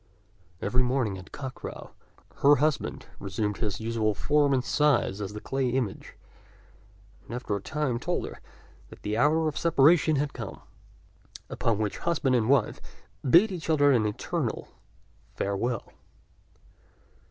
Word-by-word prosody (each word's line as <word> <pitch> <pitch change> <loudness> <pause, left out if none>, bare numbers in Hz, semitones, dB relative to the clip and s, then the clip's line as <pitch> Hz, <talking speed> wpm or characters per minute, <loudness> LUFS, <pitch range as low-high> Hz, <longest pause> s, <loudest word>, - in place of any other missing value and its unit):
Every 125 - +2
morning 125 -6 0
at 95 - -13
cock 130 -2 -6
crow - - -9 0.5
her 145 +1 +6
husband 150 +1 -1
resumed 100 +1 -2
his 105 -4 -2
usual 110 -2 0
form 145 +5 +2
and 130 -2 +2
size 135 -9 +2
as 100 0 -4
the 105 - -6
clay 135 +2 -1
image; 120 -5 -3 1.1
and 115 - -7
after 120 -4 -2
a 100 - -4
time 150 -1 -1
he - - -6
told - - -2
her - - -9 0.5
that - - -14
their 105 +3 0
hour 160 +3 +3
of 150 - -2
separation 155 0 +4
had 145 0 -1
come, 115 -5 -7 0.9
upon 115 -3 0
which 105 -1 -2
husband 150 -6 +1
and 115 -1 +1
wife 135 -6 +2 0.5
bade 190 - +6
each 170 -3 -6
other 145 -2 +5
an 115 -5 +3
eternal 105 - -3 0.7
farewell. 105 +4 -2
125 Hz, 145 wpm, -27 LUFS, 110-145 Hz, 1.1 s, her